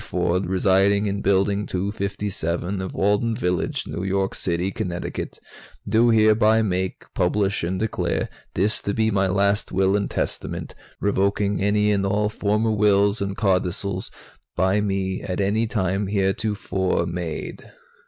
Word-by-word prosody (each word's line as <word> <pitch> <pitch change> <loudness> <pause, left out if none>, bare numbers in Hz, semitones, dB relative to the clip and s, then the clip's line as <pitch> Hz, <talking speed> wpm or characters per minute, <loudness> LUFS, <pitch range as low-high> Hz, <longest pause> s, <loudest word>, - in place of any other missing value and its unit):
Ford, 90 +1 0
residing 95 +2 +3
in 100 0 -2
Building 100 +1 +1
257 100 -2 -2
of 95 - -5
Alden 105 +3 +1
Village, 90 -7 -1
New - - -5
York 95 0 0
City, 90 +2 -1
Connecticut, 90 -2 -4 0.5
do 115 +3 +4
hereby 110 0 +4
make, 95 -2 -2
publish 100 +2 +1
and 90 +2 -1
declare 110 0 -1 0.3
this 100 +4 +1
to 100 - -2
be 110 0 +2
my 95 -1 +2
last 100 +2 +1
Will 95 +1 +2
and 100 -1 0
Testament, - - -4 0.3
revoking 100 0 +1
any 105 +1 +2
and 100 -1 +1
all 105 +2 +1
former 105 +1 0
wills 100 0 +3
and 100 0 -3
codicils 95 -1 0 0.5
by 95 +3 +2
me 95 -2 -1
at 90 0 -4
any 105 +3 +1
time 95 -2 -1
heretofore 95 -2 0
made." 85 -2 -5
100 Hz, 135 wpm, -23 LUFS, 95-105 Hz, 0.5 s, do